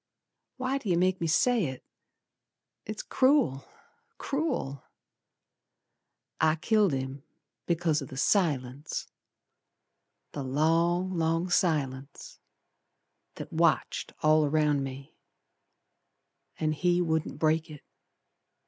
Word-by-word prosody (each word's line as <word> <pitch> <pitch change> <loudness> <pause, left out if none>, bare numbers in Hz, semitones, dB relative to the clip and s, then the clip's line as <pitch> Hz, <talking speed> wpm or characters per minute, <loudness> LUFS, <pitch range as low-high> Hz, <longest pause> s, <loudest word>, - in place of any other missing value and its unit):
Why 260 +1 -1
do 220 - -6
yer 175 - +3
make 185 +1 +1
me 165 - 0
say 225 +6 +3
it? 130 -2 -6 1.0
It's 215 +1 -5
cruel! 260 - +2 0.5
Cruel! 275 - -2 1.6
I 160 0 +3
killed 205 +3 +2
him 135 0 -4 0.5
because 165 -3 +1
o' 135 - -6
th' 130 - -10
silence. 140 -5 0 1.3
The 145 - -5
long, 165 +7 +1
long 165 +2 0
silence, 140 -6 -1 1.0
That - - -8
watched - - +1
all 155 0 +5
around 150 -1 +2
me, 135 +1 -8 1.5
And 155 -1 +1
he 175 +3 +1
wouldn't 160 -3 -1
break 160 +1 +1
it. 150 -2 -11
160 Hz, 100 wpm, -28 LUFS, 140-180 Hz, 1.6 s, all